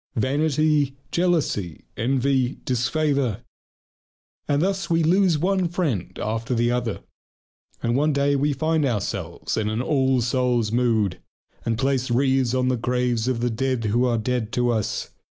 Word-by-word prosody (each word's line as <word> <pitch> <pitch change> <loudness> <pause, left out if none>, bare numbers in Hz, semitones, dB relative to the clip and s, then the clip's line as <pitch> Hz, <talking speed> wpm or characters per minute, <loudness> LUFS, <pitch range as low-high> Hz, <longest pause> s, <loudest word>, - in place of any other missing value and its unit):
Vanity, 145 +2 +1 0.2
jealousy, 160 - 0
envy, 130 +2 +1
disfavour. 125 -2 0 1.1
And 145 0 +2
thus 190 +1 -1
we 165 -1 +2
lose 180 0 +3
one 185 +3 +1
friend 160 - -2
after 115 +3 -2
the 120 +1 +2
other. 120 -3 -2 0.8
And 120 0 +1
one 150 +3 +2
day 140 0 +2
we 145 +2 +1
find 155 +3 0
ourselves 115 -8 -2
in 105 -1 0
an 110 +1 -2
all 130 0 +2
souls' 120 -2 +1
mood, 110 -6 +1 0.4
and 115 -1 -1
place 130 0 0
wreaths 130 0 +2
on 130 0 +1
the 130 -1 +1
graves 125 0 0
of 125 -3 0
the 120 0 0
dead 130 +1 -1
who 115 +4 +2
are 120 -2 +1
dead 115 0 -2
to 120 -1 +2
us. 110 -3 -2
130 Hz, 150 wpm, -23 LUFS, 115-145 Hz, 1.1 s, lose